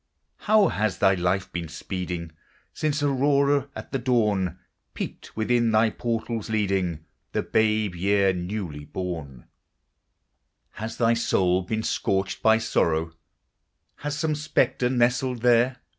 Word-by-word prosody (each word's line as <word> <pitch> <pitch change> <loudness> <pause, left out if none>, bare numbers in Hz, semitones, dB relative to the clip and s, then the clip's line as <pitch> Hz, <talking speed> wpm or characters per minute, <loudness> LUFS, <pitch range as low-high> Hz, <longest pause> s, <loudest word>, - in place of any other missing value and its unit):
How 215 -1 +5
has 105 -2 -1
thy 95 - +4
life 95 +1 -1
been 85 -1 -3
speeding 85 +1 -5 0.4
Since 150 -1 -1
Aurora, 140 0 +2
at - - -8
the 135 - -1
dawn, 105 -7 +1 0.4
Peeped - - -7
within 120 +1 +2
thy 110 0 +3
portals, 115 -1 -3
leading 95 -7 -1 0.3
The - - 0
babe 110 -3 +1
year, 95 +2 +2
newly 90 -4 -4
born? 80 -10 -6 1.3
Has 110 +1 -6
thy 115 -1 +3
soul 95 -5 +2
been 110 +4 -3
scorched 95 -2 -1
by 110 0 +5
sorrow, 80 -7 0 0.8
Has 145 0 -4
some 155 0 0
spectre 150 -4 +1
nestled 125 0 +1
there? 125 +1 +4
110 Hz, 125 wpm, -25 LUFS, 90-125 Hz, 1.3 s, How